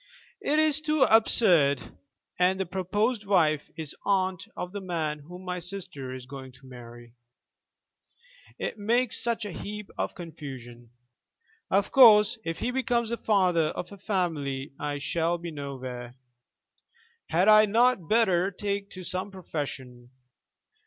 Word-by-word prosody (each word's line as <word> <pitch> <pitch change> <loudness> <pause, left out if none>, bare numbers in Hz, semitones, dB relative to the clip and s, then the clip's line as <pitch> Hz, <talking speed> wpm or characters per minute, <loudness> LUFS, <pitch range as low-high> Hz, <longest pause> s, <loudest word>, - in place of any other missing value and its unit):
It 300 - +1
is 310 -1 +3
too 305 -2 +2
absurd, 180 - +4 0.4
and 185 +1 +3
the 190 - 0
proposed 205 +6 -1
wife 155 -7 +2
is 155 -3 -6
aunt 190 -2 0
of 180 - -4
the 205 0 -6
man 160 -5 -2
whom 180 +5 -12
my 180 0 -3
sister 180 -7 -6
is 130 -1 -9
going 130 -1 -10
to 130 +1 -19
marry. 120 -2 -12 1.4
It 220 - -4
makes 235 +3 +1
such 230 -2 -1
a 205 - -5
heap 210 +3 -7
of - - -2
confusion. 130 -8 -9 0.8
Of 200 +1 +1
course, 220 -3 +7
if 165 0 -3
he 245 - -2
becomes 240 -3 0
the 235 - -1
father 185 -8 +2
of 175 +4 -5
a 200 - -10
family 155 -9 -2
I 145 0 -3
shall 165 +4 -1
be 170 0 -7
nowhere. 130 -4 -7 1.1
Had 175 +4 +2
I 215 0 +7
not 225 -5 +2
better 195 -5 +3
take 200 0 -3
to 185 - -8
some 185 +3 -3
profession? 135 -9 -6
180 Hz, 140 wpm, -27 LUFS, 145-210 Hz, 1.4 s, course